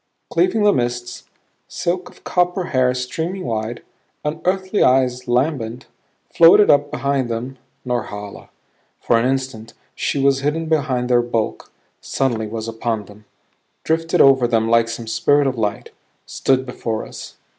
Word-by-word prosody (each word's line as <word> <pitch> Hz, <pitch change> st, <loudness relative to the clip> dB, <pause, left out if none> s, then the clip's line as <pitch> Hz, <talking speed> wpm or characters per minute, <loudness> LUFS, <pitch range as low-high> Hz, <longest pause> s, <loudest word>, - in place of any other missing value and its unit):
Cleaving 360 Hz, -, +2 dB
the 205 Hz, -, +5 dB
mists, 120 Hz, 0 st, -3 dB, 0.4 s
silk 180 Hz, +1 st, -3 dB
of -, -, -20 dB
copper 180 Hz, +1 st, 0 dB
hair 130 Hz, -1 st, +3 dB
streaming 160 Hz, +9 st, -4 dB
wide, 115 Hz, 0 st, -3 dB, 0.4 s
unearthly 185 Hz, +6 st, -1 dB
eyes 125 Hz, -1 st, +2 dB
lambent, 125 Hz, -2 st, -1 dB, 0.5 s
floated 170 Hz, +5 st, +7 dB
up 145 Hz, 0 st, +3 dB
behind 140 Hz, -3 st, -1 dB
them 125 Hz, +3 st, -5 dB, 0.3 s
Norhala. 105 Hz, -5 st, -5 dB, 0.5 s
For 115 Hz, -, +2 dB
an 120 Hz, -, +1 dB
instant 130 Hz, -4 st, -4 dB, 0.2 s
she -, -, -2 dB
was 135 Hz, 0 st, +3 dB
hidden 150 Hz, +4 st, -1 dB
behind 140 Hz, -6 st, 0 dB
their 120 Hz, -1 st, +4 dB
bulk; 120 Hz, -2 st, -3 dB, 0.3 s
suddenly 115 Hz, -5 st, -1 dB
was 110 Hz, +1 st, -5 dB
upon 115 Hz, -1 st, -3 dB
them; 105 Hz, +2 st, -16 dB, 0.6 s
drifted 165 Hz, +1 st, +1 dB
over 135 Hz, -3 st, +5 dB
them 115 Hz, -1 st, +1 dB
like 115 Hz, 0 st, +3 dB
some 115 Hz, 0 st, -5 dB
spirit 145 Hz, +6 st, +2 dB
of 135 Hz, -1 st, 0 dB
light; 105 Hz, -3 st, -3 dB, 0.3 s
stood 130 Hz, -1 st, 0 dB
before 115 Hz, -3 st, -4 dB
us. -, -, -10 dB
125 Hz, 140 wpm, -20 LUFS, 115-145 Hz, 0.6 s, floated